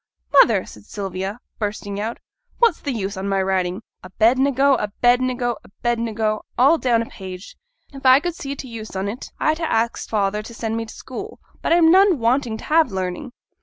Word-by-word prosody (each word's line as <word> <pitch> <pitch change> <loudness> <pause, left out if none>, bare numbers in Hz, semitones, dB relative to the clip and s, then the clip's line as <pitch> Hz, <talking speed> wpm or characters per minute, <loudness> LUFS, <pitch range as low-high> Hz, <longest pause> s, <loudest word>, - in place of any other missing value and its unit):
'Mother!' - - +5
said 105 -1 -13
Sylvia, 195 +2 -5 0.2
bursting 205 -1 -3
out, 225 +3 -3 0.4
'what's 465 -8 +3
the 285 - -3
use 200 -4 -3
on 195 +1 -3
my 195 0 +1
writing 190 +1 -1 0.2
"Abednego," 260 +8 +3
"Abednego," 245 +2 +1
"Abednego," 225 -1 -2 0.2
all 280 +6 +5
down 235 -3 +2
a - - -8
page? 185 -2 -9 0.4
If 275 - -10
I 260 0 +7
could 350 +3 -3
see 280 -3 -6
t' 270 - -8
use 220 -4 -8
on 190 +1 -2
't, 215 +6 -5
I'd 310 +1 +1
ha' 330 - -2
axed 230 +1 -1
father 210 -1 0
to 230 +2 -11
send 225 -1 -3
me 230 0 -2
t' 220 - -11
school; 400 - -8 0.2
but - - -1
I'm 330 -1 +6
none 380 -1 +5
wanting 235 -1 +1
to - - -11
have 315 -5 +3
learning.' 190 +7 -4
230 Hz, 185 wpm, -21 LUFS, 200-270 Hz, 0.4 s, I